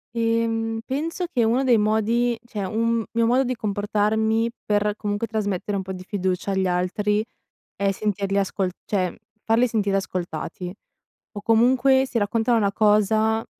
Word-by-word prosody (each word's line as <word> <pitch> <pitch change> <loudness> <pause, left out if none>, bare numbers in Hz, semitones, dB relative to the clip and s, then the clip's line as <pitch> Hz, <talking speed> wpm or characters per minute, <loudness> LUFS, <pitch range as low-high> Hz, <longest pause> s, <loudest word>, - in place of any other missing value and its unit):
Ehm, 225 -1 0
penso 330 +6 -2
che 255 -9 0
uno 235 +4 +2
dei 250 -3 +4
modi 220 +3 +1
cioè 215 -4 -5
un 230 +3 0
mio 230 0 +2
modo 250 +3 +3
di 255 0 -2
comportarmi 215 +2 0 0.2
per, 210 0 +1
comunque, 205 +1 -2
trasmettere 205 -2 -2
un 190 - -3
po' 190 0 -6
di 185 0 -8
fiducia 185 -1 -2
agli 190 -1 +1
altri 195 +4 0 0.5
è 200 0 +1
sentirli 200 -1 -1
ascol 195 -1 0
cioè 185 -4 -1 0.3
farli 230 +3 +3
sentire 205 -4 0
ascoltati. 180 -1 -4 0.6
O 205 - -6
comunque 255 +4 +4
se 250 -3 -1
raccontano 225 +3 +1
una 200 -3 +2
cosa, 215 +1 +2
215 Hz, 150 wpm, -23 LUFS, 200-230 Hz, 0.6 s, dei